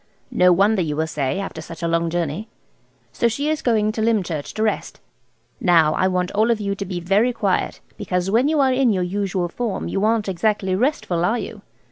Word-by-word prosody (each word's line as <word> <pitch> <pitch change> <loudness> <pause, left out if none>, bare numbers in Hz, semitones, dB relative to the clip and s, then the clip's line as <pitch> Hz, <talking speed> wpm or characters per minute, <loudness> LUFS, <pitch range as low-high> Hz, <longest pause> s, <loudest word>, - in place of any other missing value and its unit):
No 180 0 +4
wonder 200 +3 +3
you 150 -3 -2
will 160 +1 0
say, 150 +2 -2
after 195 -5 -5
such 165 +1 -9
a - - +1
long 165 0 +1
journey. 170 +4 -2 0.7
So 235 - +2
she 280 +7 -1
is 310 - -2
going 215 -3 +2
to 220 - -4
Lymchurch 190 -10 0
to 215 - 0
rest. 215 - -2 0.6
Now 165 -4 +4
I 185 - +2
want 180 -1 -1
you 205 - -2
all 230 +1 +3 0.2
to 200 - -5
be 180 -1 -4
very 200 +8 +2
quiet, 205 -6 -1 0.2
because 180 +1 -2
when 240 +6 +3
you 310 0 +1
are 265 -1 +3
in 255 -2 +3
your 185 -3 0
usual 185 -1 -1
form 205 +2 -3
you 195 - -2
aren't 220 -1 +1
exactly 195 0 0
restful, 190 - 0
are 225 +7 +2
you? - - -7
195 Hz, 205 wpm, -21 LUFS, 175-225 Hz, 0.7 s, No